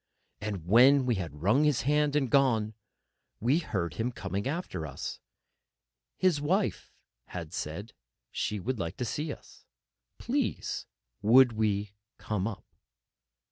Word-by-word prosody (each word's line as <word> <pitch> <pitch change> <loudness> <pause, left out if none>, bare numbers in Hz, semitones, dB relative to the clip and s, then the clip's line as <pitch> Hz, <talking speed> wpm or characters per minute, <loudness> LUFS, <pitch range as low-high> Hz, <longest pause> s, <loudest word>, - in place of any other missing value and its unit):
And 100 -6 -4
when 130 +7 +6
we 125 - +2
had 75 -3 -8
wrung 110 +10 +4
his 150 -5 +2
hand 150 +1 +2
and 145 -3 +2
gone, 115 -6 +3 0.7
we 130 +8 +3
heard 90 - -2
him 115 +2 0
coming 100 0 -3
after 135 - -3
us: 70 - -6 1.0
His 180 -6 +2
wife 185 +7 0 0.4
had 85 -2 -7
said 95 +7 -5 0.4
she 105 -1 -2
would 125 +4 -3
like 85 -2 -3
to 125 - -2
see 150 +6 -2
us, - - -12 0.5
please. - - -2 0.3
Would 120 +3 +6
we 105 -2 0 0.2
come 105 -2 -2
up? 115 - -6
115 Hz, 135 wpm, -29 LUFS, 100-140 Hz, 1.0 s, when